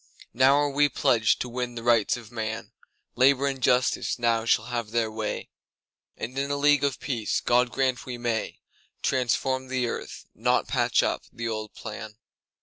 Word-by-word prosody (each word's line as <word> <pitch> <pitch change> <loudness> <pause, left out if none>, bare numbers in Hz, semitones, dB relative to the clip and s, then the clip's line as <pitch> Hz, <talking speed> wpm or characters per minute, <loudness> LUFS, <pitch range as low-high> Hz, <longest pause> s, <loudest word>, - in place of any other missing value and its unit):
Now 130 +3 +5
are 145 0 +2
we 145 +1 +3
pledged 115 -4 +2
to - - -2
win 120 0 -4
the 115 - -6
Rights 115 -1 +3
of 115 -1 -12
man; 110 -1 -4 0.4
Labour 135 +2 +4
and 135 -1 -2
Justice 125 +1 +2
now 115 -2 +1
shall 110 -1 +2
have 120 -3 -3
their 115 -1 0
way, 110 -1 -4 0.7
And 125 +3 -5
in 140 +1 -1
a 145 - 0
League 145 0 +4
of 140 -2 0
Peace—God 120 0 +1
grant 130 -2 -1
we 125 -1 -4
may—Transform 125 +2 -2
the 130 -1 -1
earth, 120 - -5
not - - +1
patch - - +2
up - - -1
the 115 0 -5
old 110 -1 -4
plan. 105 0 -8
120 Hz, 165 wpm, -26 LUFS, 115-130 Hz, 0.7 s, Now